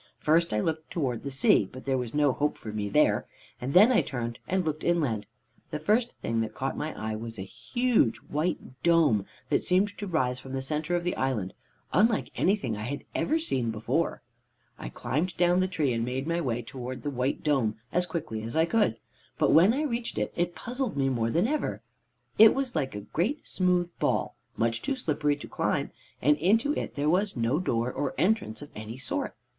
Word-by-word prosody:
First 165 +2 +2
I 105 - +1
looked 160 +2 -2
towards 130 -8 -2
the 140 - -3
sea, 130 -7 +3
but 130 - -10
there 135 -1 +1
was 125 -1 -3
no 145 -2 +4
hope 145 +3 0
for 110 - -7
me 105 -1 -2
there, - - +3 0.3
and 130 +5 -3
then 210 +7 +8
I 245 - +5
turned 120 -3 -4
and 185 -1 0
looked 155 0 -2
inland. 135 -12 +1 0.4
The 150 - -3
first 220 +10 +1
thing 115 0 0
that 110 -1 -4
caught 135 0 -2
my 155 - -3
eye 110 0 -2
was 115 +1 -6
a 95 - -4
huge 240 - +1
white 150 -4 -3
dome, 160 - +3 0.2
that - - +2
seemed 195 +3 +2
to 205 - -4
rise 130 -8 0
from 130 0 -9
the 135 - -1
center 150 +5 -1
of 175 - -1
the 180 - -1
island, 115 -8 -1 0.4
unlike 215 +4 +3
anything 185 - +1
I 105 - -6
had 140 +4 -4
ever 315 - +1
seen 130 - -1
before. 115 +10 -1 0.6
"I - - -5
climbed 165 +6 -2
down 175 +1 +4
the 185 - +2
tree, 155 -8 0
and 115 0 -1
made 130 +3 -2
my 170 +1 0
way 120 -5 -1
towards 125 +2 -7
the 145 - -2
white 130 +1 -1
dome 130 -8 +2 0.2
as 180 +1 +2
quickly 155 -10 -4
as 115 +4 -6
I 160 - +5
could, 170 - +2 0.4
but - - +3
when 175 +7 +7
I 280 +6 0
reached 235 -5 -3
it, - - -1
it 175 0 -1
puzzled 250 - -3
me 135 -1 +2
more 115 -3 0
than 170 - +2
ever. 295 - -2 0.6
It 220 0 +9
was 270 -2 -2
like 135 -7 -1
a 105 - -4
great 195 - -2
smooth 180 -2 +1
ball, - - 0 0.2
much 115 0 0
too 275 0 -1
slippery 150 - 0
to 145 - -10
climb, - - -1 0.3
and 150 +2 +5
into 220 - +3
it - - -4
there 145 +1 0
was 190 +5 +2
no 120 +6 +1
door 120 -8 0
or 145 - -2
entrance 180 - +1
of 145 - -12
any 110 +3 -7
sort. 130 - -3
150 Hz, 210 wpm, -28 LUFS, 120-180 Hz, 0.6 s, It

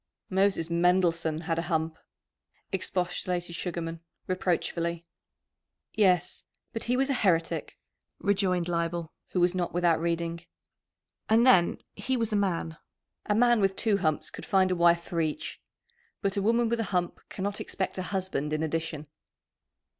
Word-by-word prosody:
"Moses 190 -3 +2
Mendelssohn 170 -2 +2
had 165 0 -1
a 170 +1 -4
hump," 160 -1 0 0.8
expostulated 180 -1 -1
Sugarman 165 -1 -4 0.3
reproachfully. 170 -2 -1 0.9
"Yes, 185 -5 +2 0.3
but 225 - -3
he 245 +1 +1
was 270 +1 +2
a 260 - 0
heretic," 170 -5 +1 0.4
rejoined 190 -3 +1
Leibel, 170 -1 -2 0.2
who 185 - -2
was 175 0 +3
not 175 -2 -2
without 175 -2 +3
reading. 170 0 -2 0.9
"And 225 +2 +5
then 180 -10 +5 0.2
he 260 0 -1
was 225 -2 -1
a - - +3
man! 175 -5 0 0.5
A 210 - +2
man 240 0 +4
with 195 -1 +2
two 215 -3 +2
humps 155 -5 0
could - - -9
find 190 -1 +3
a - - +2
wife 170 0 +4
for 170 -1 -2
each. 155 -2 -3 0.6
But 195 -1 +1
a 200 - +1
woman 230 +3 +3
with 235 +1 0
a - - +1
hump 180 -2 -1
cannot 200 +1 -3
expect 190 0 -3
a - - 0
husband 180 -6 -2
in 155 +1 0
addition." 160 -1 -2
180 Hz, 150 wpm, -28 LUFS, 165-200 Hz, 0.9 s, And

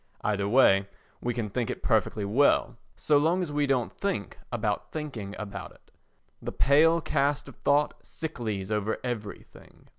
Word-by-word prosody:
Either 100 -1 0
way 100 -5 +5 0.3
we 120 - -1
can 115 -2 -2
think 115 +3 -2
it - - -5
perfectly 105 - +1
well—so 145 +5 +2
long 170 +5 +2
as 160 - -5
we 145 0 +1
don't 130 -4 0
think 200 -2 -2
about 110 -4 -2
thinking 125 -11 -5
about 105 -2 -6
it. - - -26 0.5
The - - -4
pale 160 +4 +4
cast 145 -1 0
of - - -11
thought 145 +1 +1
sicklies 110 -11 -4
over 105 0 0
everything. 115 -5 -7
125 Hz, 150 wpm, -28 LUFS, 105-145 Hz, 0.5 s, way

